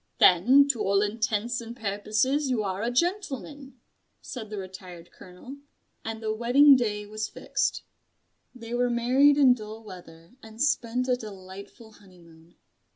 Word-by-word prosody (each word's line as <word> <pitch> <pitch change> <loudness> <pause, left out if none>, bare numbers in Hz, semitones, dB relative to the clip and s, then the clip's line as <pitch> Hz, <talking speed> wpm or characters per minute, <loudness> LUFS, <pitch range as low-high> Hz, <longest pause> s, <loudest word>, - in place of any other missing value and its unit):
"Then 250 +11 +5
to 240 -6 0
all 200 +1 +2
intents 220 +2 -2
and 235 +1 -10
purposes 220 +7 -1
you 235 -4 0
are 190 0 -3
a 230 - -1
gentleman," 285 -4 -3 0.4
said 220 -5 -8
the 210 - -6
Retired 185 -3 -10
Colonel; 185 +10 -13 0.5
and 225 0 -6
the 215 0 -1
wedding 260 +6 +5
day 210 -4 -2
was 215 +1 -5
fixed. - - -2 0.7
They 230 -1 -9
were 245 0 +1
married 255 +5 +3
in 265 -3 +6
dull 220 -1 -9
weather, 170 -4 -13
and 220 0 -14
spent 250 -3 0
a 250 - +2
delightful 200 0 -11
honeymoon. 175 -5 -20
220 Hz, 145 wpm, -26 LUFS, 200-250 Hz, 0.7 s, in